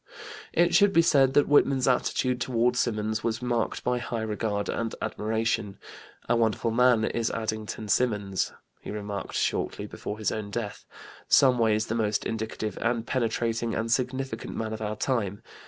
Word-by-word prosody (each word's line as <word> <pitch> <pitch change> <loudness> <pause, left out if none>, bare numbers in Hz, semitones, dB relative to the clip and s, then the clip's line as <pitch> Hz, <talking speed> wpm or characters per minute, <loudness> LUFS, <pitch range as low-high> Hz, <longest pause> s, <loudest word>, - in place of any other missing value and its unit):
It 175 +1 +3
should 205 -1 +5
be 170 - +5
said 135 -5 +4
that 145 - +5
Whitman's 140 -2 +4
attitude 125 0 +1
toward 125 0 +1
Symonds 110 -2 -1
was 115 0 -1
marked 120 -2 -1
by 125 0 0
high 120 -1 -3
regard 105 -1 -2
and 115 -1 -2
admiration. 110 -1 -1 0.5
"A 120 - +3
wonderful 115 0 +1
man 120 -1 +4
is 115 -1 -1
Addington 110 -1 -4
Symonds," 105 -4 0 0.3
he - - -10
remarked 100 -1 -5
shortly - - -1
before 105 - -6
his 110 - -1
own 105 -2 -4
death; 105 -1 -5 0.4
"some 130 -3 +5
ways 110 -1 +2
the 110 - -3
most 110 -2 0
indicative 110 -2 -3
and 115 -1 0
penetrating 115 -2 -1
and 115 +1 -2
significant 130 -1 -2
man 110 -1 -3
of 110 - -6
our 105 0 -2
time. 105 -4 -1
115 Hz, 160 wpm, -27 LUFS, 110-125 Hz, 0.5 s, should